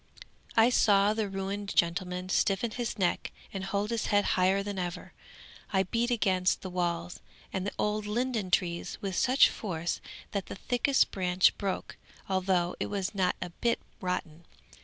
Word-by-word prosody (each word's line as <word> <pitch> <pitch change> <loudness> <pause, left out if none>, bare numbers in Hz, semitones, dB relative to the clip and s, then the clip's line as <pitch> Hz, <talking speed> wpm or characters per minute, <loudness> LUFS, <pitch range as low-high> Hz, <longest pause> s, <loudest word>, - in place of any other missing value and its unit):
I 225 +2 +6
saw 205 -3 +4
the 215 -2 -1
ruined 195 +1 -4
gentleman 180 +1 0
stiffen 195 +4 +1
his 235 -1 -3
neck 180 -3 0 0.2
and 195 -1 -4
hold 200 +3 -1
his 230 -2 -1
head 205 0 +3
higher 190 +2 +3
than 200 -1 -4
ever. 175 0 -5 0.6
I 190 -2 +3
beat 230 +6 0
against 190 -6 +2
the 185 - -5
walls 175 -1 -2 0.3
and 190 0 -2
the - - -3
old 210 0 0
linden 230 -2 -1
trees 170 -1 0
with 195 -2 -3
such 260 +2 +5
force 170 -5 -3 0.3
that 200 -2 -3
the - - -6
thickest 250 +7 +2
branch 185 -1 +3
broke, 195 -2 -3 0.3
although 185 -2 +1
it - - -1
was 195 -1 -2
not 190 -3 +1
a 175 - -7
bit 235 +7 0 0.2
rotten. 170 -3 -4
195 Hz, 160 wpm, -30 LUFS, 180-210 Hz, 0.6 s, I